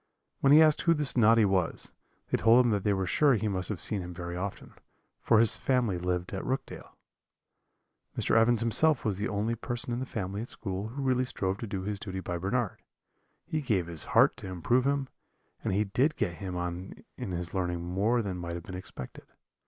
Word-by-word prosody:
When 135 - +4
he 155 +2 +9
asked 155 -1 +3
who 170 -1 +3
this 150 -2 +1
Noddy 115 -2 +5
was, 95 -4 0 0.4
they - - +3
told 120 +3 +6
him 120 - +2
that 100 -2 0
they 105 - +2
were 95 -1 0
sure 140 +7 +3
he 110 0 -1
must 95 -3 -2
have 105 -5 -3
seen 105 +1 -2
him 90 0 -7
very 85 0 -5
often, 95 +2 -5 0.5
for 115 - +4
his 115 -1 +4
family 120 -9 +1
lived 90 +1 -2
at 95 - -3
Rookdale. 135 +1 -5 1.2
"Mr. - - +1
Evans 115 0 +4
himself 130 +5 +2
was 100 -3 -1
the 105 - -1
only 105 +3 -1
person 120 +1 -1
in 120 - -2
the 130 - -4
family 100 -2 -4
at 120 - -6
school 95 0 -4
who 135 +5 -5
really 130 -1 +2
strove 95 -5 -2
to 115 - -5
do 95 -2 -4
his 100 0 -2
duty 95 -2 -5
by 90 -1 -4
Bernard 105 +4 -1 0.6
he 155 - -2
gave 105 - 0
his 85 -3 -5
heart - - +4
to - - -8
improve 105 +8 +1
him; 140 -1 0 0.6
and - - -1
he 100 +3 +2
did 130 +10 +1
get 85 -1 -2
him 95 -2 -5
on 90 +1 -5
in - - -5
his 90 -1 -4
learning 90 -3 -1
more 105 +7 +1
than 95 -3 -4
might 85 -1 -5
have 85 - -6
been 95 - -9
expected. 90 -8 -8
100 Hz, 215 wpm, -29 LUFS, 90-120 Hz, 1.2 s, he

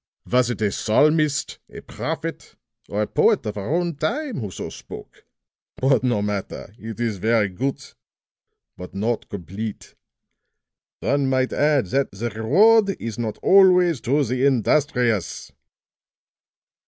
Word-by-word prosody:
"Was 125 0 +2
it 120 -3 -3
a 100 - +1
psalmist, 150 +7 +1
a - - -10
prophet 160 +1 -6 0.3
or 105 +1 -1
a - - -3
poet - - +2
of 105 - -4
our 100 +5 -4
own 175 -1 0
time 260 - -2
who 105 -4 -4
so 90 - -6
spoke? - - -12 0.5
But 130 -2 +2
no 120 -5 +1
matter, 100 -1 -5
it 110 0 -8
is 115 -4 -1
very 110 +1 +2
good 130 +9 -3 0.9
but 90 +1 -10
not 110 +4 -2
complete. 100 +3 -7 1.1
One 140 0 +1
might 130 -1 0
add 145 -5 +2
'That 135 +8 -1
the 115 +4 -4
reward 195 - +3
is 115 -1 -6
not 110 -3 -3
always 180 -6 +5
to 140 +4 +1
the 130 +1 -1
industrious.'" 125 - +1
125 Hz, 135 wpm, -22 LUFS, 105-150 Hz, 1.1 s, always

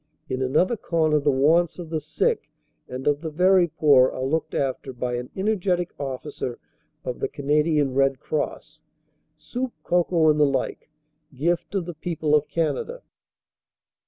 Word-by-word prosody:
In 130 0 -2
another 155 - +2
corner 160 -5 +1
the 145 - +1
wants 155 +6 +3
of 170 -3 -8
the 160 - 0
sick 155 +1 -1 0.4
and 130 +1 -6
of 145 0 +2
the 165 - -3
very 180 +3 +4
poor 140 -5 +5
are 130 - -5
looked 160 +4 -1
after 135 -1 -2
by 125 0 -3
an 125 +1 -4
energetic 190 -3 0
officer 135 -2 -4 0.5
of 125 - -4
the - - 0
Canadian 150 -1 +1
Red 135 0 +2
Cross 155 +1 -4 0.6
soup, 240 +12 -4
cocoa, 170 -2 +3
and 150 - 0
the - - +6
like, 135 +1 -2 0.5
gift 170 +8 -1
of 190 -3 0
the 175 - -6
people 160 -1 -2
of 150 -1 +3
Canada. 170 - -2
150 Hz, 155 wpm, -24 LUFS, 135-175 Hz, 0.6 s, the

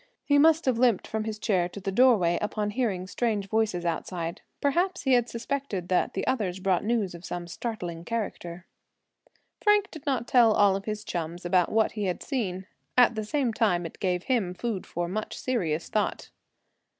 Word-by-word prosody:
He 285 0 +4
must 320 +2 +5
have 250 -3 +1
limped 240 -6 +3
from 220 0 -3
his 220 -1 -4
chair 185 -5 +1
to 200 - -8
the 195 0 -3
doorway 195 -7 +4
upon 210 0 -1
hearing 205 -6 -1
strange 205 0 -1
voices 210 -4 0
outside. 170 0 -3 0.2
Perhaps 355 +6 +1
he 265 - +3
had 245 -1 +3
suspected 230 -7 -3
that 180 - +1
the 195 - -1
others 195 -8 -1
brought 185 -2 +1
news 215 -4 0
of 170 0 -10
some 175 -1 -5
startling 175 -4 -5
character. 185 -5 -4 1.0
Frank 415 -1 +3
did 315 -4 -10
not 255 -4 0
tell 235 -3 +5
all 200 -2 +4
of 195 +1 -5
his 215 -1 -4
chums 175 -1 -4
about 180 0 +2
what 220 0 +2
he 210 -2 -3
had 180 -2 -2
seen. 190 -9 -3 0.3
At 245 -1 +6
the 220 -1 -3
same 250 +1 0
time 190 -7 +1
it 165 - -8
gave 180 -2 0
him 210 -9 0
food 215 -1 -3
for 175 0 -3
much 215 +4 -4
serious 175 -11 -1
thought. 210 -1 -2
210 Hz, 185 wpm, -27 LUFS, 180-240 Hz, 1.0 s, At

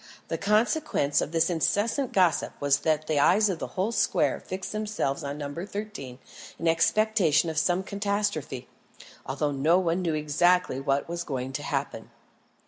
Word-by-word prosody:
The - - -1
consequence 210 - +1
of - - -3
this 165 0 +2
incessant 225 - 0
gossip 180 -4 +2
was 145 -1 +2
that 155 -1 0
the 155 -2 0
eyes 205 +8 +4
of 180 -4 -2
the - - -4
whole 195 +5 +1
square - - +1
fixed 185 0 -6
themselves 215 -10 -2
on 140 +1 -4
No. 145 -1 -5
13 185 -7 -6 0.4
in 165 - -2
expectation 170 -2 +3
of 160 - -8
some 175 +3 +1
catastrophe, 200 -10 -2 0.6
although 145 +2 -1
no 150 +5 +3
one 180 -1 0
knew 165 -3 0
exactly 155 0 +2
what 135 +1 0
was 170 0 -4
going 130 -2 -4
to - - -3
happen. - - -4
170 Hz, 160 wpm, -27 LUFS, 145-200 Hz, 0.6 s, eyes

